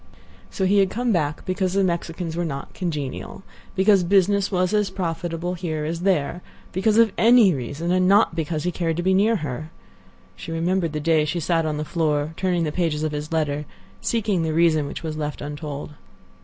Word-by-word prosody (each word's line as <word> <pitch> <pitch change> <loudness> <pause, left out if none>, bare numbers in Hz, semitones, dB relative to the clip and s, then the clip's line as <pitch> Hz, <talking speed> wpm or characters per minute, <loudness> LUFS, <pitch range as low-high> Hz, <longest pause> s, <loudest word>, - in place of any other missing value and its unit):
So 190 - -2
he 200 +2 +4
had 195 -1 +3
come 240 +3 -1
back 150 -6 -1
because 185 0 -1
the 195 0 +2
Mexicans 170 -1 -2
were 175 - -1
not 140 -4 -5
congenial; 155 0 -4 0.3
because 195 -1 +4
business 200 +2 +2
was 185 0 +1
as 210 -1 +2
profitable 170 -1 -3
here 160 -4 -3
as 165 +2 -3
there; 175 -3 0 0.3
because 210 +4 +1
of 230 -2 +5
any 230 -4 +6
reason, 145 +6 -3
and 185 0 +3
not 200 -1 +4
because 160 -1 -2
he 180 - 0
cared 165 -2 -2
to 175 - -1
be 190 +1 +3
near 210 +4 +3
her. 155 - -4 0.7
She - - -8
remembered 170 0 0
the 150 - -2
day 155 0 +2
she 155 +3 -2
sat 165 0 +1
on 150 -1 -2
the 150 - -3
floor, 155 -2 0
turning 180 -2 0
the 155 - -1
pages 155 -2 -1
of 155 - -1
his 150 +1 -5
letter, 150 -2 -1 0.4
seeking 210 -6 0
the 160 -1 -1
reason 160 -3 +3
which 145 - -7
was 155 -1 -4
left 150 -1 -4
untold. 145 0 -6
170 Hz, 195 wpm, -23 LUFS, 155-190 Hz, 0.7 s, any